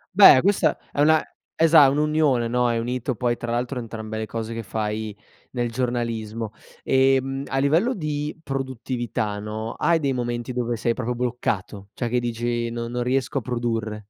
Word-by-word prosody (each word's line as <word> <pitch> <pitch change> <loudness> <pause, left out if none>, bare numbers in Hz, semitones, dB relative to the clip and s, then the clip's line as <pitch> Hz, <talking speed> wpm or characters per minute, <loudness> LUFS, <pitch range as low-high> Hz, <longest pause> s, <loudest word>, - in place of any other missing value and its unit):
Beh, 195 -10 +9
questa 200 +1 +2
è 145 - 0
una 155 +1 +5 0.3
esa 160 -4 +7
un'unione, 150 -4 +2
no, 125 +1 +1
hai 115 -1 +1
unito 125 +1 -2
poi 120 +2 0
tra 120 0 -6
l'altro 125 +2 -1
entrambe 110 -2 -6
le 110 - -3
cose 115 0 -4
che 115 - -4
fai 105 0 -3 0.4
nel 120 -2 -1
giornalismo. 115 -3 -2 0.3
Ehm, 135 +1 +2
a 135 - -2
livello 165 - +2
di 150 -2 -3
produttività, 125 -5 -3
no, 110 +2 -4
hai 170 - +2
dei 140 -3 0
momenti 120 0 -3
dove 120 -1 -1
sei 115 +1 0
proprio 125 0 -3
bloccato, 110 -5 -3
cioè 120 -2 -2
che 125 - +1
dici: 120 0 -2
"Non 115 0 -4
non 125 0 -2
riesco 130 +2 0
a - - -9
produrre?". 115 -3 -2
120 Hz, 170 wpm, -24 LUFS, 115-135 Hz, 0.4 s, Beh